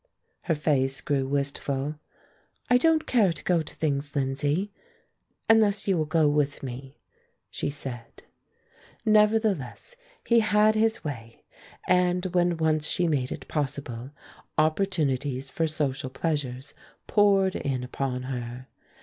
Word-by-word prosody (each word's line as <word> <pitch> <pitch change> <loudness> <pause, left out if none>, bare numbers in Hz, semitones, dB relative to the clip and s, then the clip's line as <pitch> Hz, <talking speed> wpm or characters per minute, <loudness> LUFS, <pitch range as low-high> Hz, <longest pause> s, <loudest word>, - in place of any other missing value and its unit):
Her 165 - +1
face 135 -3 +1
grew 135 -2 -1
wistful. 140 +1 -2 0.7
"I 250 - +6
don't 320 +2 +3
care 215 -8 +3
to - - -7
go 175 -2 +2
to 155 - -8
things, 145 -2 -2
Lindsay, 145 +8 0 0.8
unless 215 -3 +4
you 195 - +3
will 155 -2 0
go 160 -1 +3
with 145 -1 0
me," 135 +2 -7 0.5
she - - -2
said. 125 -5 -7 0.8
Nevertheless, 215 - +2 0.3
he 235 -1 +4
had 215 -1 +4
his 220 +1 +1
way, 115 -6 -7 0.4
and 180 0 +2
when 175 -1 +2
once 155 -1 +1
she 180 - +1
made 135 -5 0
it - - -7
possible, 135 -4 -3 0.5
opportunities 145 -6 0
for 165 - 0
social 145 -3 -2
pleasures 135 -3 -3 0.3
poured 195 -2 +3
in 130 -3 -2
upon 125 0 -3
her. 125 0 -6
150 Hz, 125 wpm, -26 LUFS, 135-185 Hz, 0.8 s, I